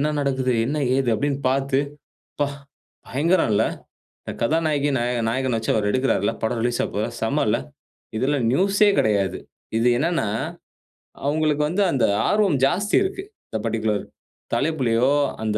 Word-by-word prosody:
"என்ன 150 +1 +1
நடக்குது? 130 -2 0
என்ன, 150 +4 -1 0.2
ஏது?" 135 -3 0
அப்படீன்னு 140 +4 -1
பாத்து, 135 0 +1 0.6
"அப்பா, 145 - 0 0.6
பயங்கரல்ல! 135 - +2 0.6
இந்த - - -6
கதாநாயகி 150 +1 +1
நாய 120 0 0
நாயகன 130 0 0
வச்சு 110 - -3
அவர் 105 -2 +1
எடுக்குறார்ல 130 -5 +1
படம் 115 +1 0
ரிலீஸ் 120 -1 0
ஆவபோவுதா? 105 +3 -2
செம்ம 140 +7 +1
இல்ல." 115 +3 +2 0.6
இதுல 140 +5 +1
நியூசே 200 +6 +3
கெடையாது. 100 -4 +1 0.4
இது 120 - +2
என்னன்னா, 165 -6 0 1.0
அவங்களுக்கு 150 0 +1
வந்து 200 +4 +1
அந்த 135 - +2 0.2
ஆர்வம் 200 -9 +3
ஜாஸ்தி 200 +8 +1
இருக்கு 385 0 -4 0.3
இந்த 110 - -3
பர்ட்டிகுலர் 110 -2 -1 0.5
தலைப்பிலயோ, 130 -2 +1 0.3
அந்த 110 -1 0
135 Hz, 135 wpm, -23 LUFS, 115-150 Hz, 1.0 s, நியூசே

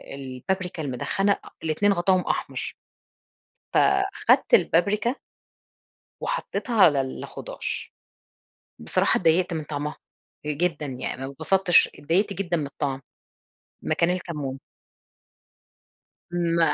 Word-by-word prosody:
البابريكا 155 +6 -4
المدخنة 145 +10 0
أ - - -2
الاتنين 165 +6 +2
غطاهم 185 0 +3
أحمر. - - -2 1.0
فاخدت 390 +4 +3
البابريكا 210 - +3 1.1
وحطّيتها 245 - +1
على 145 -4 +6
الخضار، 130 -1 -7 1.1
بصراحة - - +2
اتضايقت 175 +1 +2
من 160 -1 -2
طعمها 150 0 -4 0.5
جدًا 150 0 -1
يعني، 130 0 -4
ما 135 - -6
اتبسطتش 185 +5 +4
اتضايقت 195 +7 +1
جدًا 175 -3 -1
من 150 - -2
الطعم، 140 -1 -3 0.8
مكان 170 0 +1
الكمون. 150 -7 -3 1.7
م 170 -1 +1
170 Hz, 95 wpm, -25 LUFS, 145-195 Hz, 1.7 s, على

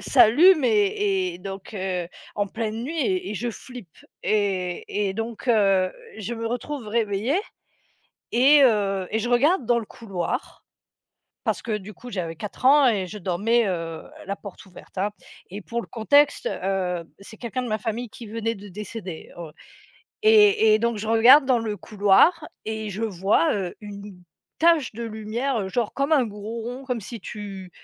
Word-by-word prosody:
s'allume 290 - +6
et 200 -4 +1
et - - -10
donc 195 +2 -8
heu, 185 -3 -2 0.3
en 205 - 0
pleine 220 +2 -4
nuit 325 +4 -4
et 370 +1 -1
et - - -4
je 240 +4 -2
flippe 235 - -11 0.3
et 200 -1 -1
et 190 - -4
donc 225 +3 -5
heu, 195 -5 +3 0.3
je 220 +3 -4
me 230 0 -4
retrouve 245 +1 -4
réveillée 220 - 0 0.9
et 280 +4 +6
heu 200 -5 +2
et 220 - 0
je 230 - -2
regarde 265 +4 +3
dans 240 0 +3
le 225 - -5
couloir 220 - -5 0.8
parce - - -1
que, 215 -2 -2
du 205 +1 -10
coup, 245 +6 -11
j'avais 170 -6 -4
4 210 +8 -7
ans 280 +1 +7
et 205 -6 +1
je 210 +4 -8
dormais, 205 +6 +1
heu, 165 -3 -3 0.2
la 200 - -3
porte 200 -2 -11
ouverte, 190 0 -16
hein 200 +3 0 0.4
et 205 +2 -6
pour 235 +2 -4
le - - -5
contexte, 285 +6 +3
heu, 180 -2 -2 0.2
c'est 210 +3 -13
quelqu'un 250 +2 -4
de 250 - -4
ma 215 -1 0
famille 225 +2 -4
qui 235 - -11
venait 225 +1 -3
de 205 0 -11
décéder, 195 -3 -8
oh, 165 -3 -8 0.7
et 420 - +6
et 215 - +4
donc 235 +1 0
je 210 - -5
regarde 235 +6 +7
dans 255 -2 +3
le 220 -2 -3
couloir 210 - +3 0.2
et 220 -1 -4
je 205 +2 -5
vois, 205 - +2
heu, 190 -4 -3
une 205 -1 -9 0.4
tache 325 -7 +3
de 235 +2 -6
lumière, 225 +4 -2
heu, - - -4
genre, 225 +3 -1
comme 275 +3 +1
un 280 -4 +4
gros 215 +1 -6
rond, 245 +4 -6
comme 250 -3 -2
si 230 +3 -8
tu 195 -2 -8
220 Hz, 180 wpm, -24 LUFS, 195-240 Hz, 0.9 s, ans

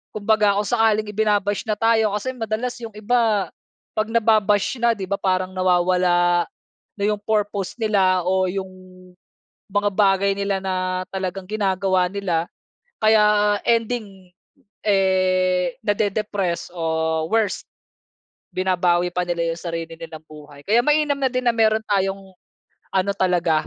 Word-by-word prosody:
kumbaga, 210 -1 +2
kung 205 - -2
sakaling 220 -2 +2
ibinabash 205 -1 0
na 215 -1 -1
tayo 225 -2 +3
kasi 260 +5 -4
madalas 225 +1 -3
yung 225 - -6
iba 215 -3 +1 0.5
pag 215 -1 0
nababash 215 -2 +2
na, 235 0 +4
di 195 -3 -6
ba, 200 - +1
parang 185 -1 0
nawawala 175 -1 +2 0.5
na - - -2
yung 210 -1 0
purpose 205 -3 -1
nila 190 -5 +2
o 185 0 +2
yung 190 0 -4 1.1
mga 205 0 +2
bagay 195 0 +3
nila 200 -1 -1
na 185 -1 -2
talagang 190 -1 -4
ginagawa 190 -3 +1
nila. 180 -5 -1 0.6
Kaya 210 -1 +4
ending, 215 -6 -1 0.5
eh, 185 -2 +2
nade-depress 205 -4 -1
o 160 -1 -1
worst, 220 -3 0 0.9
binabawi 180 -1 +1
pa 180 - 0
nila 170 -1 -1
yung 165 - -8
sarili 165 -1 -5
nilang 160 -1 -9
buhay. 150 -2 -13
Kaya 225 +4 +4
mainam 295 0 +2
na 265 -1 +1
din 255 0 -2
na 240 - +3
meron 220 -1 +2
tayong 195 -1 -1 0.6
ano 195 +1 +1
talaga, 170 -4 +1
195 Hz, 130 wpm, -22 LUFS, 185-215 Hz, 1.1 s, na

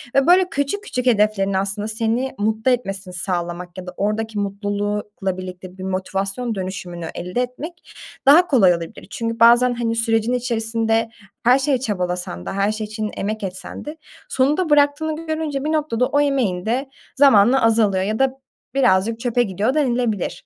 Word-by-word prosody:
ve, 275 +2 +4
böyle, 365 +1 +5
küçük 330 +6 -2
küçük 250 -10 -3
hedeflerin 210 -4 +2
aslında 195 +2 -1
seni 230 +4 -1
mutlu 220 +4 +1
etmesini 195 -6 -3
sağlamak 175 -1 -4
ya 185 0 -7
da 180 - -6
oradaki 215 +1 -1
mutlulukla 205 -1 -3
birlikte 185 0 -8
bir 185 - -8
motivasyon 195 +5 -2
dönüşümünü 180 -3 -5
elde 180 +8 -2
etmek 285 +8 -7 0.3
daha 320 +6 +7
kolay 195 -10 +5
olabilir. 170 0 -7
Çünkü 230 0 -3
bazen, 240 +2 +6
hani, 235 -1 -1
sürecin 225 +1 +1
içerisinde 225 -2 0 0.3
her 250 +3 +5
şeye 275 0 +1
çabalasan 180 - -3
da, - - -4
her 200 +2 +1
şey 215 0 -4
için 215 0 -4
emek 215 +2 -3
etsen 185 -1 -6
de 300 +2 -7 0.3
sonunda 300 +7 +1
bıraktığını 300 +2 +2
görünce 315 -3 -2
bir 310 - 0
noktada 295 -6 +1
o 290 +3 +1
emeğin 245 -11 0
de 255 +5 -1 0.3
zamanla 260 -2 +5
azalıyor 215 -4 +3
ya 215 +3 -2
da 270 -1 +3 0.4
birazcık 225 -3 +2
çöpe 245 0 +1
gidiyor 205 +4 -1
denilebilir. 245 -8 -1
225 Hz, 160 wpm, -21 LUFS, 195-260 Hz, 0.4 s, daha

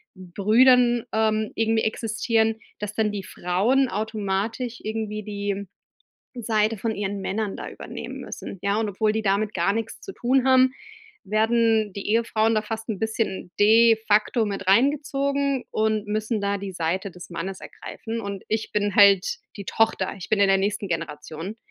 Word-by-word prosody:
Brüdern, 235 +6 +3
ähm, 220 -1 +1
irgendwie 225 0 +1
existieren, 220 0 0 0.2
dass 210 0 -4
dann 215 0 +1
die 205 -2 -4
Frauen 210 +11 +1
automatisch 220 +3 -3
irgendwie 215 -1 -3
die 200 -1 -3 0.7
Seite 220 -1 +1
von 220 +2 -2
ihren 200 -1 -3
Männern 205 +1 -2
da - - -6
übernehmen - - -8
müssen, 195 - -8
ja? 200 +1 +1
Und 220 - -1
obwohl 210 +2 +1
die 220 0 -1
damit 205 +1 +1
gar 195 - +2
nix 225 0 -4
zu 390 - -8
tun 260 -1 +1
haben, 260 0 +5 0.5
werden 220 0 +2
die 200 - -5
Ehefrauen 225 0 +2
da 215 - +1
fast 225 +1 -6
'n 215 -4 -2
bisschen 220 -5 -2
de 225 +2 +6
facto 215 +3 +3
mit 195 -2 -4
reingezogen 280 +3 +2
und 215 -1 0
müssen 215 +1 -1
da 200 0 -1
die 195 -1 -6
Seite 180 +3 -2
des 180 0 -12
Mannes 185 +3 -5
ergreifen, 230 0 -7
und 200 -3 -6
ich 220 0 -2
bin 205 -1 0
halt 200 -2 +5 0.2
die 200 - -7
Tochter. 220 -2 +1
Ich 180 - -8
bin 215 - +2
in 200 - +5
der 195 0 +4
nächsten 205 +1 -1
Generation, 165 +3 -5
215 Hz, 165 wpm, -24 LUFS, 200-225 Hz, 0.7 s, de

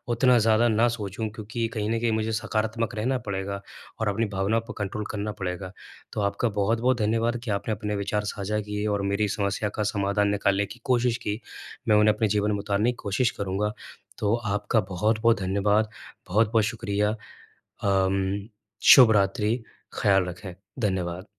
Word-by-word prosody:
उतना 125 0 +5
ज़्यादा 110 +1 +4
ना 115 +1 +3
सोचूँ, 105 +2 -4
क्योंकि 115 +2 -3
कहीं 105 -1 -2
न 115 0 0
कहीं 115 -1 +1
मुझे 110 0 0
सकारात्मक 110 +1 -1
रहना 125 +5 0
पड़ेगा 100 0 -3 0.4
और 110 - 0
अपनी 110 +3 0
भावना 100 +4 +1
पे - - -4
कंट्रोल 105 0 -3
करना 105 0 -3
पड़ेगा। 90 0 -4 0.4
तो 105 - -2
आपका 100 +4 0
बहुत-बहुत 115 +5 +1
धन्यवाद 115 +2 +1
कि 115 - -3
आपने 100 +2 -2
अपने 105 0 -3
विचार 105 +1 -1
साझा 105 +1 -2
किए 105 0 -4
और 100 - -2
मेरी 105 +1 +1
समस्या 100 +1 -1
का 105 - 0
समाधान 100 0 +1
निकालने 100 0 +1
की 115 +4 -11
कोशिश 125 -3 +2
की। 105 +1 -1 0.5
मैं 105 - +5
उन्हें 105 0 +5
अपने 110 +1 +1
जीवन 105 0 +1
में 100 - -1
उतारने 105 +3 +1
की 125 - -9
कोशिश 105 +5 +1
करूँगा। 100 +2 -1 0.5
तो 105 +1 +1
आपका 105 -1 0
बहुत-बहुत 110 +4 +2
धन्यवाद, 100 +3 +1 0.4
बहुत-बहुत 110 +3 +3
शुक्रिया। 105 -2 -1 0.7
अम, 95 +1 +1 0.5
शुभ 125 -5 +8
रात्रि, 105 +2 +2 0.5
ख़याल 95 -2 +4
रखें। 90 +1 -7 0.3
धन्यवाद। 90 -1 -3
105 Hz, 165 wpm, -26 LUFS, 100-110 Hz, 0.7 s, शुभ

